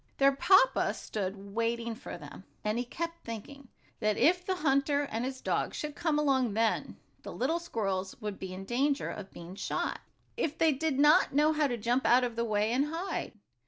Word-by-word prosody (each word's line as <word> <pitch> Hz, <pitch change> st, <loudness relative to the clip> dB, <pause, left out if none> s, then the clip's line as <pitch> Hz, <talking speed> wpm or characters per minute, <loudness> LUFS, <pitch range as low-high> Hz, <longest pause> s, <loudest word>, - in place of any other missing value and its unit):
Their 275 Hz, 0 st, +5 dB
papa 380 Hz, -, +4 dB
stood 200 Hz, -1 st, -5 dB
waiting 230 Hz, +1 st, -1 dB
for 225 Hz, -, -8 dB
them, 150 Hz, +2 st, -11 dB, 0.2 s
and 215 Hz, +2 st, 0 dB
he 245 Hz, -, -2 dB
kept 335 Hz, +6 st, -5 dB
thinking 250 Hz, +5 st, -8 dB, 0.3 s
that 215 Hz, 0 st, +1 dB
if 360 Hz, +3 st, +4 dB
the 375 Hz, 0 st, -1 dB
hunter 285 Hz, -2 st, +2 dB
and 230 Hz, -4 st, -3 dB
his 260 Hz, 0 st, -4 dB
dog -, -, -1 dB
should 300 Hz, -1 st, -4 dB
come 315 Hz, -3 st, 0 dB
along 260 Hz, -7 st, +2 dB
then, 225 Hz, -1 st, 0 dB, 0.2 s
the -, -, -8 dB
little 320 Hz, +7 st, 0 dB
squirrels 195 Hz, -, -3 dB
would 210 Hz, -3 st, -5 dB
be 190 Hz, -1 st, -6 dB
in 190 Hz, +1 st, -7 dB
danger 275 Hz, +6 st, 0 dB
of 200 Hz, -2 st, -8 dB
being 170 Hz, +1 st, -10 dB
shot, 195 Hz, -, -2 dB, 0.4 s
if 320 Hz, -10 st, -2 dB
they 320 Hz, -1 st, +4 dB
did 295 Hz, 0 st, -1 dB
not 295 Hz, -1 st, +5 dB
know 300 Hz, +2 st, +4 dB
how 300 Hz, -1 st, +2 dB
to 245 Hz, -3 st, -2 dB
jump 240 Hz, +4 st, +1 dB
out 250 Hz, +1 st, +5 dB
of 240 Hz, -2 st, -2 dB
the 235 Hz, -, 0 dB
way, 215 Hz, -1 st, +1 dB
and 265 Hz, +4 st, +2 dB
hide. 345 Hz, +4 st, -3 dB
255 Hz, 195 wpm, -30 LUFS, 215-300 Hz, 0.4 s, Their